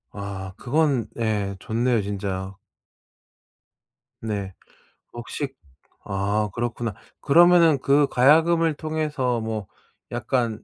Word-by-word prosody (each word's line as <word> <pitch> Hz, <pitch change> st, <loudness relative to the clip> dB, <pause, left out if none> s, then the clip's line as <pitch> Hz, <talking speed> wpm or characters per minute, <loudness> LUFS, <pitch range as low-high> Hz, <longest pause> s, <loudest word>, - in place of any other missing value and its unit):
아 95 Hz, -2 st, -7 dB
그건 135 Hz, -4 st, +1 dB
예 105 Hz, -3 st, -1 dB
좋네요 115 Hz, +2 st, 0 dB
진짜. 95 Hz, -1 st, -4 dB, 1.7 s
네. 100 Hz, -4 st, -4 dB, 0.6 s
혹시 120 Hz, +4 st, -4 dB, 0.6 s
아 100 Hz, +2 st, -1 dB
그렇구나. 120 Hz, -1 st, -3 dB, 0.3 s
그러면은 170 Hz, -1 st, +5 dB
그 140 Hz, +2 st, +3 dB
가야금을 160 Hz, +5 st, +4 dB
통해서 150 Hz, -6 st, -2 dB
뭐 110 Hz, -3 st, -4 dB, 0.4 s
약간 120 Hz, -1 st, -1 dB
120 Hz, 180 characters per minute, -24 LUFS, 105-145 Hz, 1.7 s, 그러면은